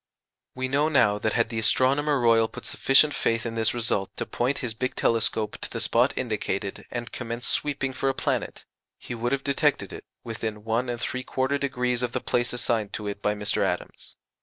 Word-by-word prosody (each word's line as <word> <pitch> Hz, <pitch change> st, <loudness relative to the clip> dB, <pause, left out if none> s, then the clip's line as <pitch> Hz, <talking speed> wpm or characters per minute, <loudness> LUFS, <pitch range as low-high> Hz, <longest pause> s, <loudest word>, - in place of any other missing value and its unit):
We 130 Hz, 0 st, -1 dB
know 145 Hz, +4 st, +2 dB
now 115 Hz, -9 st, +3 dB
that 110 Hz, +1 st, 0 dB
had 115 Hz, -1 st, +2 dB
the 115 Hz, -1 st, -2 dB
Astronomer 140 Hz, +6 st, +3 dB
Royal 115 Hz, -2 st, +4 dB
put -, -, -10 dB
sufficient 145 Hz, +2 st, +4 dB
faith 115 Hz, 0 st, 0 dB
in 115 Hz, -, -3 dB
this 115 Hz, 0 st, +1 dB
result 105 Hz, -4 st, 0 dB
to -, -, -2 dB
point 125 Hz, +4 st, -1 dB
his 115 Hz, -, -2 dB
big 130 Hz, +3 st, -3 dB
telescope 110 Hz, -2 st, +1 dB
to -, -, -5 dB
the -, -, -4 dB
spot 120 Hz, +4 st, +3 dB
indicated 105 Hz, -4 st, -3 dB
and 120 Hz, -1 st, -5 dB
commence 120 Hz, 0 st, -4 dB
sweeping 135 Hz, -2 st, 0 dB
for 135 Hz, +1 st, 0 dB
a 135 Hz, -, -1 dB
planet, -, -, -2 dB, 0.3 s
he -, -, -7 dB
would 120 Hz, +1 st, -2 dB
have 140 Hz, 0 st, 0 dB
detected 140 Hz, -1 st, +1 dB
it -, -, -9 dB, 0.2 s
within 110 Hz, -2 st, -5 dB
1 115 Hz, +3 st, 0 dB
3/4° 130 Hz, +1 st, -1 dB
of 125 Hz, -1 st, -2 dB
the -, -, 0 dB
place 120 Hz, 0 st, 0 dB
assigned 115 Hz, -4 st, -1 dB
to 105 Hz, -, -4 dB
it 100 Hz, 0 st, -4 dB
by 105 Hz, 0 st, +1 dB
Mr. 105 Hz, 0 st, +1 dB
Adams. -, -, -3 dB
120 Hz, 190 wpm, -26 LUFS, 110-130 Hz, 0.3 s, Royal